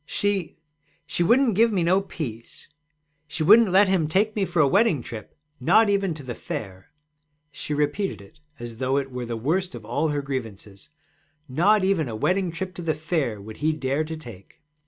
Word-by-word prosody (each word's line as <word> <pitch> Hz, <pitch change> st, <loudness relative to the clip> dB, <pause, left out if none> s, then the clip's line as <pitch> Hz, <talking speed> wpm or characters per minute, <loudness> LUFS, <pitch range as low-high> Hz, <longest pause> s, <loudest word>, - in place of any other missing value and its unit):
'She 190 Hz, +2 st, -2 dB, 0.5 s
she -, -, -2 dB
wouldn't 235 Hz, +6 st, +4 dB
give 230 Hz, +3 st, +4 dB
me 185 Hz, -5 st, +1 dB
no 185 Hz, +3 st, +3 dB
peace. 120 Hz, -, -8 dB, 0.6 s
She 155 Hz, +1 st, -2 dB
wouldn't 215 Hz, +5 st, +7 dB
let 190 Hz, +2 st, +5 dB
him 185 Hz, -5 st, +1 dB
take 205 Hz, +7 st, +1 dB
me 200 Hz, -3 st, +1 dB
for 175 Hz, -2 st, -2 dB
a 145 Hz, -, +6 dB
wedding 185 Hz, -, +2 dB
trip, 110 Hz, -2 st, -9 dB, 0.2 s
not 205 Hz, -, +4 dB
even 195 Hz, -4 st, 0 dB
to 150 Hz, -, -9 dB
the 125 Hz, -2 st, -5 dB
Fair.' 95 Hz, -4 st, -7 dB, 0.6 s
She 150 Hz, +1 st, -5 dB
repeated 170 Hz, +7 st, -1 dB
it 100 Hz, +9 st, -17 dB, 0.2 s
as 120 Hz, -1 st, -8 dB
though 130 Hz, +2 st, 0 dB
it 135 Hz, -1 st, -2 dB
were 125 Hz, -1 st, -5 dB
the 115 Hz, -1 st, -3 dB
worst 170 Hz, +8 st, -1 dB
of 115 Hz, -3 st, -10 dB
all 145 Hz, +8 st, 0 dB
her 145 Hz, -2 st, -2 dB
grievances: 110 Hz, -7 st, -7 dB, 0.6 s
'Not 190 Hz, +10 st, +3 dB
even 185 Hz, -8 st, +1 dB
a 110 Hz, -, -5 dB
wedding 180 Hz, -, 0 dB
trip 185 Hz, +2 st, -5 dB
to 180 Hz, -, -8 dB
the 160 Hz, -3 st, -1 dB
Fair 155 Hz, -, -2 dB
would 110 Hz, +2 st, -10 dB
he 155 Hz, +1 st, +1 dB
dare 140 Hz, 0 st, -1 dB
to 160 Hz, +1 st, -6 dB
take.' 115 Hz, -11 st, -13 dB
155 Hz, 195 wpm, -24 LUFS, 125-190 Hz, 0.6 s, wouldn't